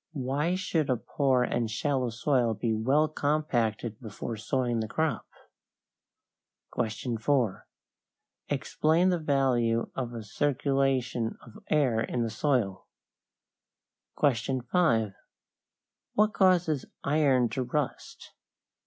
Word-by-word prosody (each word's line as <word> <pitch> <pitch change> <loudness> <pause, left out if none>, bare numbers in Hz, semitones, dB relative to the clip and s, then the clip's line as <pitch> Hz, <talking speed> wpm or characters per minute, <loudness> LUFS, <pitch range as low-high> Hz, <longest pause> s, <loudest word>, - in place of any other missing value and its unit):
Why 140 +7 0
should 165 -6 -1
a 125 - +2
poor 130 0 +1
and 120 -2 -1
shallow 130 +2 0
soil 120 -1 +1
be 115 +1 -1
well 135 +8 +2
compacted 120 -8 -1
before 115 0 -6
sowing 120 +1 -1
the 110 - -2
crop? 160 +7 -1 1.5
4. 115 0 -1 0.8
Explain 165 +4 +2
the 180 -2 +1
value 125 -6 +1
of 120 -2 -4
a 115 - -5
circulation 135 -1 0
of 215 - -13
air 135 -7 +2
in 120 +1 -1
the 115 - -2
soil. 115 -6 0 1.3
5. 125 - +1 1.0
What 210 +1 +3
causes 175 -7 +3 0.2
iron 140 -4 +3
to 130 - -2
rust? 130 +1 -4
130 Hz, 100 wpm, -28 LUFS, 115-150 Hz, 1.5 s, What